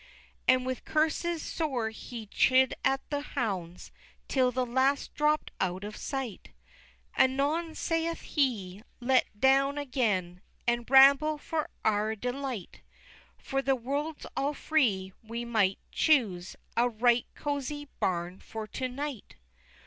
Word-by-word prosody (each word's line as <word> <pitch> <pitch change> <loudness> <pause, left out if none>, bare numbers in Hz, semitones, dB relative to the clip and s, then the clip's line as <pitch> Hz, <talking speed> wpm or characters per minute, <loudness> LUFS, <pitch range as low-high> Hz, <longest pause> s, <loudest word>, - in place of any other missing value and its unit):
XVI. - - -24 0.2
And 255 0 -3
with 255 -1 -3
curses 320 +2 0
sore 255 -9 -2
he 225 0 -8
chid 260 +5 +4
at 270 +1 +1
the 290 -1 0
hounds, 195 - -4 0.4
Till 255 -2 +2
the 255 +1 0
last 260 +3 +1
dropt 300 +1 +1
out 185 +1 -1
of 210 +1 -6
sight, 265 -7 -5 0.7
Anon 295 +5 +2
saith 330 0 -1
he, 210 - -1 0.2
"Let's 255 +1 +3
down 275 +4 +4
again, 210 -11 -1 0.2
And 240 0 0
ramble 275 +3 +7
for 310 +1 -3 0.2
our 215 +1 +2
delight, 250 -3 -5 0.6
For 270 0 -2
the 270 0 +2
world's 285 +5 -3
all 285 +2 0
free, 205 -14 +1
and 220 - -24
we 235 +1 -3
may 210 -5 +2
choose 210 - +2 0.2
A 240 +1 +3
right 240 +1 +2
cozie 290 0 -3
barn 180 0 -1
for 220 -1 -7
to 255 +4 -3
night!" 275 -1 -6
255 Hz, 135 wpm, -29 LUFS, 220-285 Hz, 0.7 s, ramble